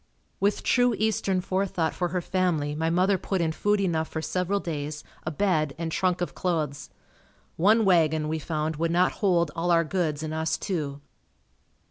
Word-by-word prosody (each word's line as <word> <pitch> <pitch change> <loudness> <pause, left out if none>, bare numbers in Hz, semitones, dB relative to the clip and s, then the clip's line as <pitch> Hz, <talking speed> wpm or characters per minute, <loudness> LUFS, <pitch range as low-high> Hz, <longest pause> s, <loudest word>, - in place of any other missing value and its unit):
With 200 +1 +1
true 245 -2 +3
eastern 205 -3 +1
forethought 185 -3 -1
for 175 - -1
her 180 +1 -2
family 170 -5 0
my 160 +2 -1
mother 185 +3 +2
put 190 +1 -2
in 165 -2 +1
food 205 +5 +1
enough 165 -5 0
for 160 - -4
several 180 +4 -1
days, 150 -3 -4 0.2
a - - +2
bed 155 -4 0
and 165 0 -3
trunk 180 +1 0
of 175 - -2
clothes. 155 -5 -2 0.7
One 215 +6 +4
wagon, 160 -4 +3
we 160 +1 -2
found, 155 0 -2
would 165 +1 0
not 175 +2 +3
hold 170 -6 +2
all 170 +1 -1
our 170 -1 +4
goods 160 -3 -1
and 155 0 -4
us 160 0 -1
too. 145 -7 -3
170 Hz, 175 wpm, -26 LUFS, 155-185 Hz, 0.7 s, One